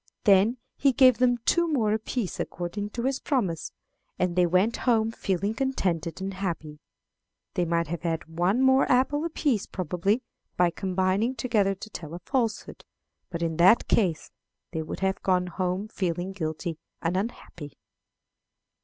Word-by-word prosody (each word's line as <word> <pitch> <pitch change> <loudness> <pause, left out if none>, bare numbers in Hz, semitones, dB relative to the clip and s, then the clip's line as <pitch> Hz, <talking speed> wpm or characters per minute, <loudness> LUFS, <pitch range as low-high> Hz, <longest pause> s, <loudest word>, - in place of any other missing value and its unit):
Then 205 +5 +5 0.2
he 275 -2 +3
gave 255 -1 +6
them 245 -1 +4
two 340 0 +3
more 220 -7 +2
apiece, 220 -1 -3
according 190 +4 -4
to 235 +2 -5
his 270 +1 0
promise, 195 - -1 0.5
and 180 -1 0
they 180 -1 +4
went 185 +6 +2
home 225 -1 +3
feeling 200 -1 -1
contented 185 - -1
and 195 +1 -4
happy. 165 -6 -4 0.7
"They 175 - 0
might 170 0 +1
have 165 +1 -5
had 165 -2 -2
one 175 +9 +1
more 265 0 +4
apple 265 +4 +2
apiece, 290 - 0
probably, 185 - -1 0.3
by 175 -1 +4
combining 190 +6 0
together 215 -5 +1
to 205 +3 -10
tell 165 -3 -7
a - - -7
falsehood; 235 -6 -2 0.5
but 170 -2 -4
in 165 -1 -1
that 185 +7 +5
case 175 -8 +1 0.4
they 160 -2 -2
would 155 - -6
have 190 0 0
gone 185 -1 +2
home 185 +3 -2
feeling 180 -3 -2
guilty 160 -2 -4 0.2
and 170 +2 0
unhappy." 185 - -5
190 Hz, 155 wpm, -27 LUFS, 175-230 Hz, 0.7 s, gave